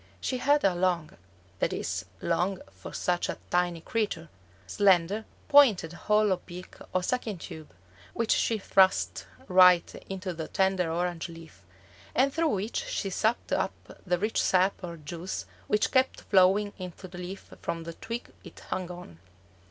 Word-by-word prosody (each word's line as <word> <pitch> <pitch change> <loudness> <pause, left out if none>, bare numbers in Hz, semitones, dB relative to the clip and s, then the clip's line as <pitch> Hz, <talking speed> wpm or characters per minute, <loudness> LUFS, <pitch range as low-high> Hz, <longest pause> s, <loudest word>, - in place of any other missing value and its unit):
She 255 - -2
had 285 +3 +3
a 195 - +4
long 175 -3 0 0.5
(that - - +1
is, - - -3 0.2
long 175 +3 0
for 95 -1 -10
such 175 -1 -1
a - - -3
tiny 175 -1 +1
creature), 205 -7 -2 0.4
slender, 195 - +3 0.2
pointed 240 - +6
hollow 210 0 +2
beak 180 +1 -9 0.2
or 185 - 0
sucking 225 -2 -1
tube, 160 -2 -9 0.5
which 230 -1 0
she 225 - +2
thrust 190 -2 +2 0.2
right 180 -1 +6 0.2
into 190 -1 -4
the 160 -1 -5
tender 190 -3 +1
orange 175 0 -2
leaf, 165 - -12 0.5
and 270 +2 +3
through 330 0 +2
which 210 -1 -2
she 195 - -3
sucked 220 +5 0
up - - +1 0.3
the 180 -1 +1
rich 215 +5 0
sap 185 +1 +2
or 170 -1 -6
juice 165 +4 -5 0.2
which 210 - +1
kept 260 0 +2
flowing 195 +2 +4
into 185 +1 -7
the 180 0 -10
leaf 180 +2 -8
from 165 0 -3
the 170 0 -7
twig 230 +7 -6
it - - -12
hung 185 -1 -2
on. 175 - -10
185 Hz, 155 wpm, -28 LUFS, 175-210 Hz, 0.5 s, pointed